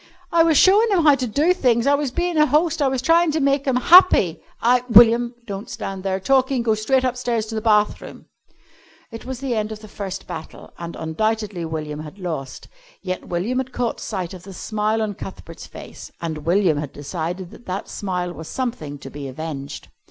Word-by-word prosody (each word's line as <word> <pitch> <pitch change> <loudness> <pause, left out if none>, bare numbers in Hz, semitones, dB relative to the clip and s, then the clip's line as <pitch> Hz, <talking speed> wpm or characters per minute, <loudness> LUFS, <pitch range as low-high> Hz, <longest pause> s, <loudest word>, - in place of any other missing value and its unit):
"I 335 - +4
was 325 -2 +4
showin' 420 +7 +5
'em 360 -4 +3
how 300 -2 +7
to 260 -2 -1
do 295 +10 +2
things. 240 -9 +2
I 280 - +4
was 285 -1 0
bein' 350 +6 -2
a 305 -1 +4
host. 305 +3 +1
I 280 - +3
was 260 -1 -1
tryin' 335 +3 +4
to 315 - +1
make 275 0 +1
'em 265 - +2
happy! 250 - +6 0.2
I 245 +1 +3
" - - -24
"William, 235 +1 +6
don't 200 0 -6
stand 195 -1 -5
there 190 0 -1
talking. 260 +3 +2
Go 225 -2 +2
straight 235 +5 +1
upstairs 245 -3 -1
to 220 - -8
the 220 - -2
bathroom." 210 -2 0 0.9
It 230 +1 -9
was 260 -1 -5
the 270 -3 -1
end 215 -1 -2
of 215 0 -7
the 215 - -11
first 195 -2 -6
battle, 160 0 -9
and 170 0 -6
undoubtedly 205 +2 -2
William 155 -2 -5
had 155 +5 -9
lost. 160 -8 -6 0.4
Yet 185 -1 -4
William 195 +9 -1
had 260 -1 -5
caught 240 -2 -2
sight 185 -5 -4
of 185 - -9
the 195 +1 -11
smile 215 +3 -1
on 210 -1 -2
Cuthbert's 175 -3 -10
face - - -11
and 160 -2 -5
William 175 -4 +3
had 145 -2 -6
decided 170 +4 -5
that 240 - -15
that 190 +2 -4
smile 180 -3 -3
was 160 -1 -9
something 225 - -4
to 140 - -10
be 145 -1 -7
avenged. 140 0 -7
215 Hz, 205 wpm, -21 LUFS, 175-260 Hz, 0.9 s, how